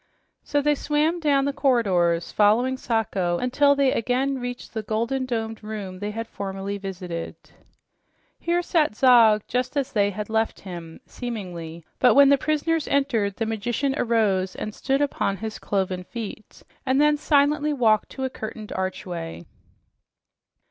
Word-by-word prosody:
So 290 0 -1
they 295 0 +4
swam 300 +4 0
down 285 -4 +2
the 280 - -1
corridors 190 - +2
following 225 +5 +3
Sacho 200 -8 -1
until 280 +6 +3
they 275 -2 +3
again 260 +4 0
reached 245 0 -6
the 220 - -2
golden 235 +5 -1
domed 225 -2 -3
room 205 -4 -6
they 205 +1 -3
had 225 +2 -4
formerly 195 0 -5
visited. 180 -4 -6 1.0
Here 345 +1 0
sat 310 - +1
Zog 225 -4 +6
just 250 +4 -2
as 275 -1 -1
they 205 -3 +2
had 210 +1 -5
left 220 0 -1
him, 170 -4 -9
seemingly, 175 -9 -7
but 250 - +5
when 280 0 +7
his 280 - +5
prisoners 310 +1 0
entered, 235 -8 +1
the 225 - -2
magician 240 +5 -1
arose 205 -7 +1
and 215 - -5
stood 270 +4 0
upon 200 -8 -1
his 220 +1 -6
cloven 190 -2 -2
feet 220 0 -8 0.2
and 265 0 +1
then 300 0 +4
silently 295 0 +2
walked 225 -7 +2
to 265 - -5
a 260 - 0
curtained 220 -2 -7
archway. 180 - -4
225 Hz, 150 wpm, -24 LUFS, 200-275 Hz, 1.0 s, when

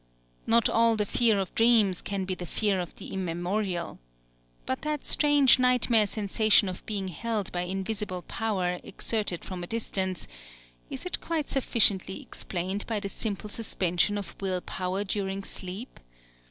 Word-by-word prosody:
Not 230 0 +5
all 230 0 +4
the 210 -1 0
fear 225 0 +3
of 190 -3 -2
dreams 225 -6 +4
can 195 -1 -3
be 185 - -2
the 180 -1 -6
fear 205 0 +1
of 175 -2 -5
the - - -9
immemorial. 180 0 -2 0.7
But - - -2
that 300 -2 -3
strange 290 -4 +5
nightmare 245 -4 +4
sensation 210 0 +3
of 185 -1 -5
being 200 -3 -2
held 215 +2 -3
by 175 0 -2
invisible 190 -1 -3
power 185 -6 -1
exerted 210 -6 -2
from 185 -2 -6
a 175 - -5
distance 190 -5 -2 0.6
is - - -5
it 360 - -2
quite 320 -3 -2
sufficiently 200 -7 +2
explained 190 +3 -3
by 220 -2 -1
the 200 -1 -4
simple 210 0 -2
suspension 205 -3 +1
of 200 - -6
will 185 -2 -1
power 185 +3 -3
during 195 -1 -2
sleep? 195 +6 -7
200 Hz, 155 wpm, -28 LUFS, 185-225 Hz, 0.7 s, Not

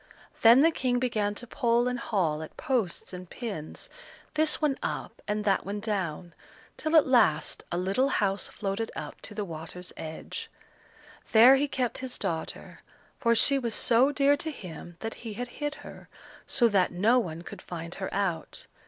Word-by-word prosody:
Then 235 +4 +8
the 325 +2 +5
King 250 -5 0
began 215 -5 0
to 245 - -5
pull 240 -1 +1
and 250 -1 -1
haul 170 -10 0
at 160 - -9
posts 230 -10 -1
and 180 -1 -8
pins, 200 -11 -6 0.5
this 310 0 +3
one 295 -3 +1
up - - -4
and 210 0 -1
that 195 -2 +2
one 205 +2 -4
down, 185 -6 -3 0.4
till 315 +1 -1
at 315 - +7
last 160 - +3
a 175 - -1
little 195 +9 +1
house 200 -5 0
floated 200 +2 -3
up - - -7
to 210 - -8
the 210 -1 -2
water's 170 +1 -6
edge. 160 0 -7 0.8
There 235 +4 +9
he 285 +2 +1
kept 255 -3 -2
his 260 -1 -3
daughter, 170 -5 -4 0.4
for 235 -3 +3
she 275 +5 +4
was 235 -4 -2
so 250 +4 +4
dear 285 0 +4
to 315 - -3
him 175 - -9
that 225 0 -3
he 225 -3 -6
had 245 +3 -5
hid 295 0 -1
her, - - -11 0.4
so 240 -3 +4
that 195 -4 +2
no 215 +8 +4
one 170 -6 -4
could - - -9
find 170 -1 -7
her 190 - -5
out. 190 -5 -2
220 Hz, 180 wpm, -28 LUFS, 180-255 Hz, 0.8 s, There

